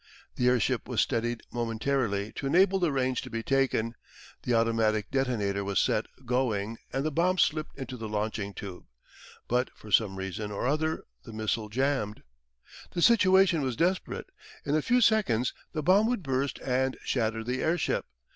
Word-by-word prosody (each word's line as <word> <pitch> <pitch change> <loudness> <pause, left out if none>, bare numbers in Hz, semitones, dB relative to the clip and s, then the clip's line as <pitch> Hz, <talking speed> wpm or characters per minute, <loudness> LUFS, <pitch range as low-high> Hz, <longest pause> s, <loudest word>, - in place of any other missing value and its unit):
The 125 - +1
airship 125 0 +1
was 125 -4 -1
steadied 120 0 0
momentarily 115 -3 -1
to 135 - -2
enable 190 +6 +4
the 175 -4 +2
range 130 -2 0
to 130 - -8
be 115 -1 -4
taken, 130 -4 +1 0.5
the 120 - 0
automatic 115 -2 +1
detonator 110 -7 0
was 100 -1 0
set - - +1 0.2
going 115 -3 -1
and 135 +2 -1
the 155 - 0
bomb 180 +5 +2
slipped 155 -3 +1
into 130 -1 -6
the 110 -2 -6
launching 105 -1 -2
tube. 95 -3 -8 0.6
But 125 +1 +1
for 105 - -13
some 100 -3 +3
reason 95 +2 -4
or 100 - -3
other 155 +4 0 0.2
the 115 - -10
missile 110 0 -2
jambed. 130 -3 -1 0.7
The 175 - -1
situation 190 -7 +5
was 130 -3 -1
desperate. 180 +7 -1 0.3
In 145 - +1
a 155 - +3
few 245 +9 +2
seconds 190 - +3 0.2
the 155 -2 -3
bomb 195 +7 +5
would 240 -6 -1
burst 135 0 -1
and 130 0 0
shatter 115 -2 -1
the 125 +3 -2
airship. 165 +1 0
125 Hz, 165 wpm, -28 LUFS, 110-150 Hz, 0.7 s, situation